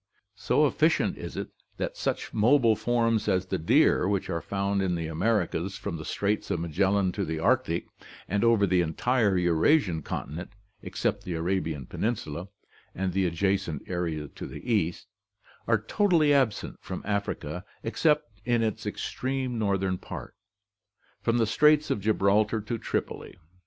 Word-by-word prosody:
So - - +2
efficient - - +2
is - - -7
it - - -4 0.3
that - - -3
such - - -3
mobile 115 0 +4
forms 115 0 +1
as 95 -2 +2
the 95 -1 -2
deer, 80 +3 +4
which 100 -1 -1
are 85 - -2
found 100 +2 -1
in 90 -2 0
the 85 -1 -3
Americas 95 +1 0
from 85 - -4
the 80 - -7
Straits 105 +1 -1
of 85 - 0
Magellan 95 +4 +1
to - - -2
the 80 0 -3
Arctic 90 0 +1 0.4
and 100 +2 0
over 115 -3 +4
the 90 -1 +3
entire 100 +5 +1
Eurasian 90 - +3
continent 80 +6 -6 0.3
except 100 - -2
the 90 -4 -4
Arabian 80 -4 -1
peninsula 90 - -3 0.5
and 95 -1 -2
the 95 -1 +2
adjacent 95 -2 -1
area 85 -4 -2
to - - -8
the 75 - -4
east, 85 -5 0 0.6
are 115 -2 +3
totally 160 - +3
absent 130 -7 +1
from - - -6
Africa 95 -5 -3 0.2
except 120 -3 +1
in 120 0 +1
its 110 -2 -2
ex - - -4
treme 130 0 -2
northern 100 -5 0
part, - - -8 0.9
from 115 +1 +1
the 115 - +3
Straits 150 +6 +4
of - - 0
Gibraltar 105 +1 +2
to 115 +2 -4
Tripoli. - - -4
100 Hz, 155 wpm, -27 LUFS, 85-115 Hz, 0.9 s, mobile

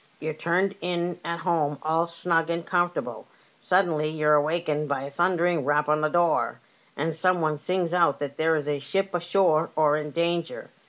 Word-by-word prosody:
You're 155 0 -3
turned 180 +5 0
in 175 0 -2
at 170 +1 -4
home 160 -5 0
all 160 +2 +1
snug 165 -1 0
and 170 0 -2
comfortable. 175 -1 -2 0.3
Suddenly 170 -5 +1
you're 155 -1 +2
awakened 150 0 0
by 135 -1 -1
a 140 - -7
thundering 175 0 +1
rap 145 +2 +1
on 150 0 +2
the 155 - +1
door, 170 0 +1 0.4
and 160 +2 -1
some 185 +2 +2
one 155 -2 -1
sings 180 0 -1
out 170 -5 +3
that 140 -1 -5
there 160 +1 +2
is 150 -2 -2
a 145 -1 -1
ship 195 +8 -2
ashore 175 -2 +2
or 150 -1 +3
in 150 0 -4
danger. 170 - -2
165 Hz, 180 wpm, -25 LUFS, 150-175 Hz, 0.4 s, out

